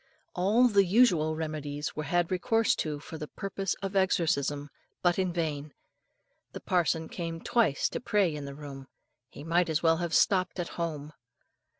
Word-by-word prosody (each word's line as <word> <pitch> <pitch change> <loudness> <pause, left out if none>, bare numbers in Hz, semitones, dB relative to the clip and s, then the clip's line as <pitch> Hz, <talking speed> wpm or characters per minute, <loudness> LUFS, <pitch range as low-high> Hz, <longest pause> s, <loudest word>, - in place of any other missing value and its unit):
All 210 +8 +4
the 200 -4 +4
usual 175 -6 +3
remedies 150 -2 -4
were 155 - -3
had 175 +3 0
recourse 225 +5 +2
to 150 -2 -2
for 160 +2 -9
the 150 - -5
purpose 195 +1 -3
of 195 0 -3
exorcism, 145 -6 +1 0.3
but 175 +1 +3
in 185 -1 +1
vain. 155 -4 -3 0.8
The - - -6
parson 165 -2 0
came 165 -1 -5
twice 220 - +1
to - - -4
pray 205 -8 +2
in 145 -1 -6
the 140 0 -7
room. 140 -2 -9 0.4
He - - -11
might 170 +2 +1
as 160 +1 0
well 165 0 +4
have 170 -1 -1
stopped 185 -2 +2
at 175 - -2
home. 155 -3 -4
165 Hz, 170 wpm, -29 LUFS, 150-185 Hz, 0.8 s, All